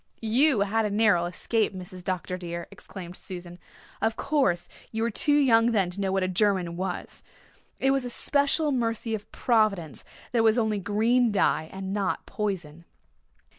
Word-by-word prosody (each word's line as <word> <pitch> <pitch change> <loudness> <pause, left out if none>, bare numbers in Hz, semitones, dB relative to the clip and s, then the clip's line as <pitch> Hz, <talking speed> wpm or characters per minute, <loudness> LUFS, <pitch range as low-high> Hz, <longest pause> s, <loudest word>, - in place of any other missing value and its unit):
"You 270 -3 +5
had 215 +3 +1
a - - 0
narrow 205 -4 +3
escape, 210 +4 -1
Mrs. 185 0 -9
Dr. 185 0 -3
dear," 170 -1 -5
exclaimed 180 -2 -10
Susan. 175 -2 -8 0.4
"Of 220 +1 +1
course 265 - +1 0.2
you 225 0 -2
were 235 - 0
too 290 +7 +2
young 235 -4 +4
then 190 -5 +1
to 195 +3 -6
know 190 -1 0
what 190 0 +1
a - - +1
German 185 -2 +1
was. 185 +2 -5 0.6
It 270 - +3
was 270 -1 +1
a 245 - -4
special 285 +4 +1
mercy 230 -3 -1
of 210 -1 -5
Providence 210 - +1 0.3
that 240 - +1
it - - +5
was 225 +1 +4
only 220 -3 +1
green 225 +5 +2
dye 160 -5 +1
and 190 0 -5
not 200 -2 -1
poison." 170 -6 -4
205 Hz, 170 wpm, -26 LUFS, 185-230 Hz, 0.6 s, You